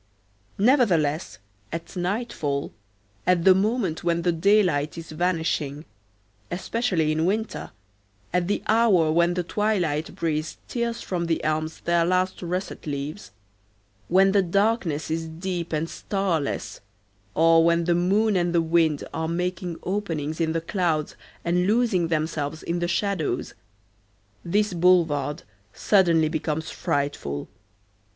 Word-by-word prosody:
Nevertheless, 190 - +2 0.3
at 165 +3 -6
nightfall, 175 -7 -2 0.5
at 180 -2 +3
the 190 - +8
moment 195 -4 0
when 170 -1 +1
the 175 - +3
daylight 170 -4 +2
is 165 -1 -8
vanishing, 160 -3 -1 0.6
especially 180 -3 0
in 160 +1 0
winter, 215 +5 -1 0.6
at 180 -1 +1
the 205 - -1
hour 210 -8 +4
when 170 +2 +3
the 180 - 0
twilight 175 -6 -1
breeze 155 -1 -2
tears 235 -1 -2
from 175 -2 -2
the 165 - 0
elms 155 +1 -2
their 170 0 +2
last 185 +2 0
russet 180 -1 -4
leaves, 140 -7 -5 0.8
when 195 +2 +4
the 200 0 +4
darkness 185 -5 0
is 165 0 -2
deep 170 +1 -4
and 160 +1 -1
starless, 175 -7 -2 0.5
or 165 +1 +5
when 170 0 +3
the 175 +1 +2
moon 200 +5 +2
and 175 -1 +1
the 170 - +4
wind 160 -2 +2
are 160 0 -2
making 180 0 -2
openings 165 -6 -2
in 160 -1 +1
the 165 - -1
clouds 165 -4 -1 0.3
and 180 +2 +1
losing 215 -6 +2
themselves 155 -1 -2
in 170 +1 -2
the 175 - 0
shadows, 185 -2 -1 0.9
this 205 +3 +1
boulevard 165 -5 +2 0.3
suddenly 170 -6 +3
becomes 155 0 -2
frightful. 140 - -2
170 Hz, 130 wpm, -25 LUFS, 160-190 Hz, 0.9 s, the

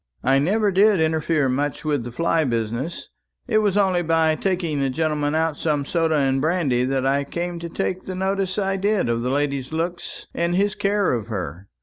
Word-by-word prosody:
I 135 +1 +4
never 205 +7 +2
did 200 +1 +4
interfere 160 -2 +1
much 140 +4 -2
with 145 -5 0
the 120 - -6
fly 165 +4 +1
business; 115 +5 -3 0.4
it 215 -3 +3
was 205 -2 +1
only 190 -3 +3
by 165 -1 +2
taking 170 -3 -1
the 135 -1 +1
gentleman 150 +1 0
out 160 -2 0
some 150 -3 0
soda 165 0 +1
and 135 -2 +1
brandy 155 -6 +1
that 135 0 -1
I 140 +1 +2
came 170 +4 -4
to 170 0 -6
take 185 +2 -3
the 185 - -5
notice 190 0 -1
I 195 -1 0
did 200 - +1
of 115 0 0
the 125 - -1
lady's 140 -1 -1
looks 170 +2 -4
and 170 +1 0
his 200 +2 +2
care 200 -3 +1
of 115 -3 -3
her. 95 -4 -5
160 Hz, 200 wpm, -22 LUFS, 135-185 Hz, 0.4 s, I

